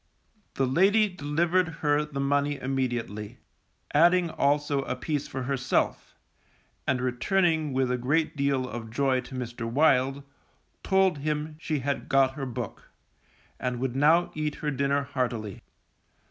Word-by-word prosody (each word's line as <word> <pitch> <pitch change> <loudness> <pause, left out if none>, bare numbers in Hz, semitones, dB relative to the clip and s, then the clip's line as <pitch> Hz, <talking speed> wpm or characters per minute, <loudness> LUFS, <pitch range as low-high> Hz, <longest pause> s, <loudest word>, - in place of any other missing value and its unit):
The 135 - +1
lady 195 +11 +4
delivered 175 +2 +1 0.2
her 145 0 +3
the 150 -2 -6
money 145 +1 +1
immediately, 120 -6 -3 0.6
adding 175 +2 +4
also 145 -1 +1
a - - -2
piece 150 -3 -3
for 130 -1 -5
herself, 130 0 -1 0.7
and 130 - +1
returning 155 +5 +1
with 130 -1 +1
a 125 - 0
great 150 +7 0
deal 140 -2 0
of 115 0 -6
joy 130 +2 +1
to 130 - -10
Mr. 120 -2 -4
Wild, 135 0 +3 0.6
told 190 -5 +2
him 150 +1 -2
she 155 -3 -2
had 140 +2 -3
got 135 -1 +4
her 135 -1 -5
book, 120 - -6 0.7
and 125 -1 -2
would 130 -1 -2
now 160 +5 +4
eat 155 -1 -2
her 150 - -3
dinner 140 +1 +1
heartily. 120 -7 -3
140 Hz, 140 wpm, -27 LUFS, 130-155 Hz, 0.7 s, lady